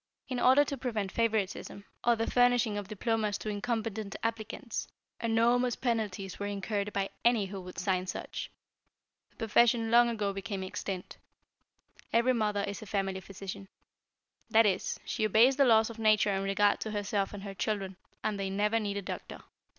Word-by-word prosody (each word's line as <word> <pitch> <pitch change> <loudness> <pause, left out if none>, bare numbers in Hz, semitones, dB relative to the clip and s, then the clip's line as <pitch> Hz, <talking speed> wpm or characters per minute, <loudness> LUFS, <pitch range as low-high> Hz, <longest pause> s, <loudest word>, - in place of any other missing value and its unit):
In 255 -2 -2
order 260 +4 +6
to 280 - -4
prevent 220 -6 -2
favoritism, 210 -3 -1 0.2
or 240 0 +4
the 225 0 -1
furnishing 245 -3 +3
of 205 -2 -4
diplomas 215 0 -1
to 215 - -5
incompetent 220 -1 -3
applicants, 230 +1 -3 0.3
enormous 235 +2 +2
penalties 210 -6 -2
were 205 - -2
incurred 200 +1 -2
by 195 -1 -1
any 235 -4 +4
who 195 0 -6
would 180 -1 -10
sign 185 +1 0
such. - - -5 0.8
The - - -33
profession 230 0 +3
long 240 0 +6
ago 210 -4 -1
became 195 0 -4
extinct. 185 0 -5 0.9
Every 235 +2 +3
mother 210 -3 0
is 200 -1 -4
a 215 - -9
family 195 -2 -1
physician. 195 +1 -8 0.8
That 225 0 +6
is, 210 +2 0
she 225 - -2
obeys 225 +6 +5
the 280 - +5
laws 225 -2 +5
of 230 - -11
nature 215 -2 +4
in 195 - 0
regard 195 +1 +2
to 220 - -4
herself 205 -1 -1
and 200 -1 -8
her 200 -1 -6
children, 195 -1 -2 0.3
and 210 -2 -1
they 195 -1 -1
never 210 +3 +1
need 205 -2 -2
a 200 - -4
doctor. - - -7
210 Hz, 170 wpm, -30 LUFS, 195-230 Hz, 0.9 s, order